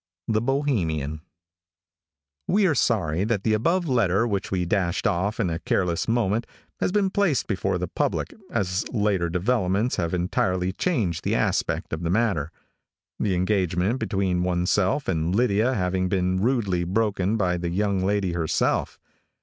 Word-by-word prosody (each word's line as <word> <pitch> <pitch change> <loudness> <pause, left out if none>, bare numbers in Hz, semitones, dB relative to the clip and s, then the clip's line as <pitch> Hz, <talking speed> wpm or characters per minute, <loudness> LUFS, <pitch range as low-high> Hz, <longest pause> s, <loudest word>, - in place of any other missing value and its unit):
The 110 -1 +1
Bohemian. 90 - -1 1.3
We 200 +1 +3
are 170 - +3
sorry 95 - +1
that 105 -2 -1
the 110 - +2
above 170 - +1
letter, 115 -5 +2
which 100 -4 -2
we 90 -2 -1
dashed 90 -1 0
off 100 +5 0
in 90 - +1
a 80 - -2
careless 90 -2 0
moment, 115 -1 +1 0.3
has - - 0
been 195 -1 +1
placed 200 -9 +1
before 95 -3 -1
the 90 0 -3
public, - - -2 0.2
as 90 0 -1
later 100 -6 0
developments 100 +4 0
have 85 -2 -1
entirely 90 +1 0
changed 100 - -1
the - - 0
aspect - - -1
of 80 - -3
the 85 - -2
matter; 95 -7 +1 0.7
the 100 -4 +1
engagement 95 +3 0
between 95 -6 0
ourself 90 +7 +1
and 85 0 0
Lydia 120 +2 +2
having 90 -1 0
been 95 0 0
rudely 105 -7 +1
broken 100 +2 0
by 90 -3 +1
the 85 0 -3
young 100 +1 0
lady 100 -1 +1
herself. 85 -2 0
95 Hz, 150 wpm, -25 LUFS, 90-115 Hz, 1.3 s, We